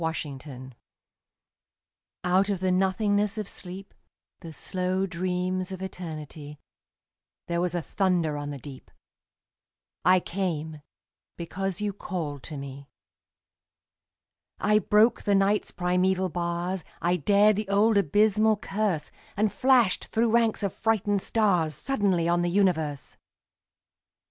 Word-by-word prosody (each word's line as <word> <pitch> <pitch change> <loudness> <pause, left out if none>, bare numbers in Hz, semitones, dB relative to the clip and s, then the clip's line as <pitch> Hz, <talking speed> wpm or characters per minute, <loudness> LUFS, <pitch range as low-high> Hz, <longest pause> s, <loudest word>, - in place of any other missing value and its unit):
The 155 -4 -3
Call 130 +1 -10 1.5
Out 185 +3 +2
of 200 -3 -1
the 185 0 +1
nothingness 205 +3 +1
of 210 -2 -3
sleep, 190 +1 -8 0.5
The 165 -3 -9
slow 185 +3 -1
dreams 185 +1 -2
of 190 0 -6
Eternity, 155 -5 -7 0.9
There 170 0 -1
was 180 0 -1
a 175 - -1
thunder 180 -6 0
on 145 0 -4
the 145 - -5
deep: 135 -1 -11 1.1
I 185 0 +5
came, 160 -5 -3 0.6
because 190 +3 -4
you 205 -1 -1
called 160 -8 -5
to 150 - -6
me. 140 0 -9 1.7
I 210 +1 +3
broke 215 +3 +3
the 205 -2 +2
Night's 195 +2 +2
primeval 180 +1 +1
bars, 175 +1 -2 0.2
I 175 +1 +1
dared 205 +6 +4
the 210 -2 -3
old 210 +3 +3
abysmal 210 +4 +3
curse, 200 -5 -2 0.3
And 210 0 +1
flashed 250 -7 +3
through 225 0 +1
ranks 230 -2 +2
of 200 - -1
frightened 205 -3 0
stars 180 -10 +1
Suddenly 195 - 0
on 175 0 +2
the 175 - 0
universe! 160 -7 0
185 Hz, 125 wpm, -27 LUFS, 170-205 Hz, 1.7 s, I